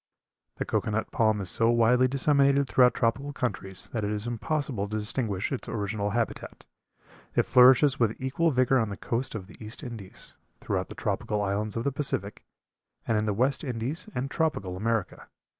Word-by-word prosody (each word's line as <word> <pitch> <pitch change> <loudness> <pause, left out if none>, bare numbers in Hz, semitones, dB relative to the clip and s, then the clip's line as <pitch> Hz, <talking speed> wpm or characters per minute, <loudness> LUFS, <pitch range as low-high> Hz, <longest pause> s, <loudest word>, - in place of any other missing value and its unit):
The - - -2
cocoa - - -1
nut 110 +1 -2
palm 110 -2 +2
is 95 - -2
so 115 0 +3
widely 120 +2 +4
disseminated 140 +1 +3
throughout 125 -1 +4
tropical 135 +5 0
countries 95 -7 -3
that 110 -3 -2
it 105 - -1
is 105 0 -2
impossible 120 -2 -2
to 110 +1 -3
distinguish 105 -2 -2
its 135 - -4
original 105 -1 -2
habitat. 115 +2 -3 0.7
It - - +4
flourishes 130 +2 +6
with 115 -2 +1
equal 140 +6 +1
vigor 130 -1 +3
on 110 -3 0
the 100 - -6
coast 120 +1 -3
of 100 -4 -5
the 105 - -13
East 110 +7 -8
Indies, 115 -7 -9 0.3
throughout - - -2
the - - -9
tropical 105 -1 -2
islands 105 +2 -2
of 115 - -1
the 140 - 0
Pacific, 125 -8 -3 0.6
and 115 - +2
in 105 0 0
the - - +2
West 130 +9 +1
Indies 135 - -4
and 135 +3 -2
tropical 100 - -1
America. 110 +1 -2
115 Hz, 180 wpm, -27 LUFS, 105-130 Hz, 0.7 s, flourishes